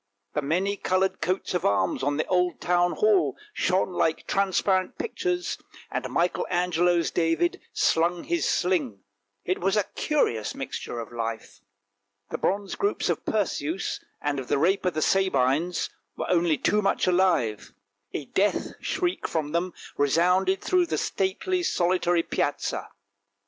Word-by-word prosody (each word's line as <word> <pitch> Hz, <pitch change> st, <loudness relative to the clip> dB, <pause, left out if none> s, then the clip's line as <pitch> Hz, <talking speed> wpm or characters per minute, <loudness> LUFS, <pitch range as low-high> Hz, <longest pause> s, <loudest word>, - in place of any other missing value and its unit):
The 150 Hz, -, 0 dB
many 185 Hz, +8 st, 0 dB
coloured 185 Hz, 0 st, 0 dB
coats 185 Hz, +1 st, -1 dB
of 180 Hz, -, 0 dB
arms 95 Hz, -2 st, +1 dB
on 145 Hz, +2 st, 0 dB
the 155 Hz, -, 0 dB
old 180 Hz, -2 st, +1 dB
Town 175 Hz, 0 st, +2 dB
Hall 425 Hz, -4 st, +3 dB, 0.2 s
shone 185 Hz, -, +1 dB
like 165 Hz, -2 st, 0 dB
transparent 190 Hz, +2 st, +1 dB
pictures, 360 Hz, -5 st, -2 dB, 0.3 s
and -, -, -3 dB
Michael 175 Hz, +1 st, 0 dB
Angelo's 175 Hz, -1 st, +2 dB
David 165 Hz, 0 st, +1 dB
slung 170 Hz, +1 st, +2 dB
his 345 Hz, -1 st, -1 dB
sling; 145 Hz, -, 0 dB, 0.4 s
it 185 Hz, -, 0 dB
was 195 Hz, +3 st, +2 dB
a 210 Hz, -, +3 dB
curious 120 Hz, -, 0 dB
mixture 120 Hz, -, -5 dB
of 115 Hz, -1 st, -7 dB
life! 115 Hz, -1 st, -5 dB, 0.7 s
The -, -, -3 dB
bronze 200 Hz, +1 st, -1 dB
groups 405 Hz, +1 st, 0 dB
of -, -, -1 dB
Perseus, 185 Hz, -4 st, -1 dB, 0.2 s
and 145 Hz, -1 st, -1 dB
of 130 Hz, -, -6 dB
the -, -, +1 dB
Rape 185 Hz, +7 st, +2 dB
of 180 Hz, -, -1 dB
the 155 Hz, -, +1 dB
Sabines, 170 Hz, -2 st, +1 dB, 0.3 s
were -, -, -2 dB
only 170 Hz, -3 st, +3 dB
too 210 Hz, -, +2 dB
much 195 Hz, -, +1 dB
alive; 180 Hz, -, +2 dB, 0.4 s
a 145 Hz, -, -4 dB
death 200 Hz, +9 st, +1 dB
shriek 360 Hz, -1 st, -1 dB
from 155 Hz, -3 st, -2 dB
them 170 Hz, +3 st, 0 dB, 0.3 s
resounded 180 Hz, +6 st, +3 dB
through 360 Hz, -2 st, +2 dB
the -, -, -1 dB
stately, 275 Hz, -, -1 dB
solitary, 175 Hz, -, +2 dB
Piazza. -, -, -2 dB
180 Hz, 145 wpm, -26 LUFS, 155-195 Hz, 0.7 s, Hall